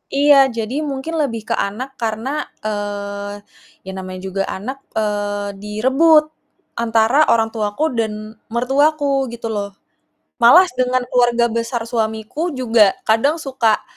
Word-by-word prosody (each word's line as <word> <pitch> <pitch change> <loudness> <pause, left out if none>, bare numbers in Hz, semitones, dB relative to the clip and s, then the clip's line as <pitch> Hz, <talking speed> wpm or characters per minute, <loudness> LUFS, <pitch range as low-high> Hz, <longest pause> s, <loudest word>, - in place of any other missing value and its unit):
Iya 290 +1 +6 0.2
jadi 225 +3 -3 0.2
mungkin 275 +5 -5
lebih 230 -6 -2
ke - - +3
anak 225 +7 -3
karena, 225 +2 -2 0.4
eee, 205 -1 -4 0.5
ya - - -4
namanya 185 -1 -7
juga 195 +1 -2
anak, 240 +8 -5 0.2
eee, 205 -1 -2
direbut 265 +10 +4 0.6
antara 225 +2 +2
orang 225 -1 +3
tuaku 210 +5 -2 0.2
dan 220 -1 0 0.4
mertuaku 275 +2 +1
gitu 235 -1 -5
loh, 200 -1 -3 0.7
malas 350 +10 +7
dengan 255 0 +1
keluarga 240 -1 +3
besar 230 +1 -2
suamiku 220 +3 -3
juga 230 -6 +3
kadang 225 +7 +3
suka, 260 -8 0
230 Hz, 125 wpm, -19 LUFS, 210-265 Hz, 0.7 s, malas